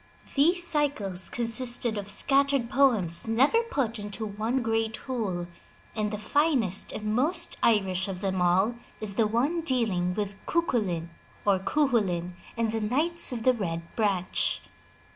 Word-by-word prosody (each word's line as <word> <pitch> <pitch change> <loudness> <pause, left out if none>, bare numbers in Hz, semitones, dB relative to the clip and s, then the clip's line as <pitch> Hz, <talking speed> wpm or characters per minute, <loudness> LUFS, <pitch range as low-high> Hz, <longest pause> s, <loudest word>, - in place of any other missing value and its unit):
These 345 +5 +3
cycles 225 - -1
consisted 240 0 0
of 205 -1 -5
scattered 275 +2 +2
poems 225 -12 +2
never 270 - +3
put 265 - -2
into 205 +2 -5
one 220 +5 -2
great 225 -1 0
whole, 210 -9 -3 0.5
and 215 -1 0
the 210 - -4
finest 230 - +1
and 215 0 -3
most 335 +8 +1
Irish 190 -4 +2
of 190 -2 -5
them 190 -2 -1
all 185 +6 +3 0.3
is 215 -2 -3
the 220 +1 +2
one 270 +10 0
dealing 215 - 0
with 205 -2 -4
Cuculain 205 - 0 0.3
or 200 -2 +3
Cuchulain 195 - 0 0.2
and 230 -1 0
the 225 0 -2
Knights 300 +11 +2
of 235 -3 -4
the 255 - +5
Red 170 -7 -5
Branch. 200 -5 0
220 Hz, 145 wpm, -27 LUFS, 195-265 Hz, 0.5 s, the